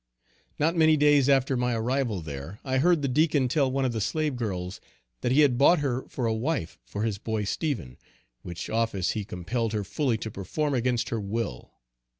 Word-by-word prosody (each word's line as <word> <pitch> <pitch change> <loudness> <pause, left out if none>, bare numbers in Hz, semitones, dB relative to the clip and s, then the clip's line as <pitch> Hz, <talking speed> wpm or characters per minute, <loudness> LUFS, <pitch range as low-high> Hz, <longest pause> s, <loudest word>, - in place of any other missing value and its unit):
Not 165 +4 +1
many 160 -2 +5
days 145 -2 +4
after 135 -1 +3
my 125 -1 0
arrival 120 -3 -1
there, 75 +5 -7
I 130 0 +1
heard 170 0 +3
the - - +2
Deacon 145 0 +2
tell 135 +1 +2
one 135 0 0
of 130 - +1
the 110 - -2
slave 150 +6 -1
girls, 95 -6 -4 0.4
that 120 - -1
he 140 +4 +5
had 130 -4 +3
bought 170 +6 +6
her 135 -3 -2
for 125 - -3
a 115 - +1
wife 120 - -2
for 100 +9 -4
his 110 -3 -1
boy 110 -1 -2
Stephen, 100 - -3 0.4
which 85 -1 -6
office 110 -5 0
he 110 - -3
compelled 105 +5 -3
her 105 -1 -1
fully 125 +3 0
to 110 0 -6
perform 140 - -2
against 125 -1 0
her 115 - -2
will. 100 - -4
120 Hz, 195 wpm, -27 LUFS, 105-140 Hz, 0.4 s, bought